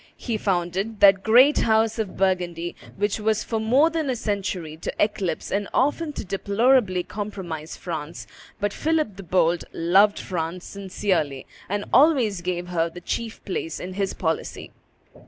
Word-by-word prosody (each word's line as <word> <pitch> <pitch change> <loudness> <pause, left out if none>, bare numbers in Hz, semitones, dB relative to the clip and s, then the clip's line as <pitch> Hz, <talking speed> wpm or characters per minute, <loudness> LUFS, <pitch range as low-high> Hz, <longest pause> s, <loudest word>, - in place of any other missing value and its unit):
He 235 - -3
founded 195 +2 -1
that 195 -1 +7
great 250 +7 +6
house 220 0 +2
of 210 -4 -3
Burgundy 175 -3 0 0.2
which 205 +2 0
was 215 0 +1
for 225 - -2
more 260 +9 +3
than 320 -4 -1
a 255 - 0
century 190 -7 -3
to 165 - -4
eclipse 195 -6 -1
and 200 +1 -1
often 295 +3 +1
to - - -6
deplorably 200 0 +2
compromise 185 -7 -6
France; 160 -2 -6 0.3
but 205 0 -1
Philip 310 -10 0
the - - -7
Bold 175 -2 +1
loved 195 +5 +4
France 175 -1 -4
sincerely, 185 -8 -2 0.2
and 205 +1 -2
always 255 - +4
gave 175 0 -3
her 170 -1 0
the 175 - -10
chief 225 +5 -4
place 165 -5 -3
in 185 +1 -6
his 195 0 -2
policy. 160 -2 -3
195 Hz, 155 wpm, -24 LUFS, 175-220 Hz, 0.3 s, that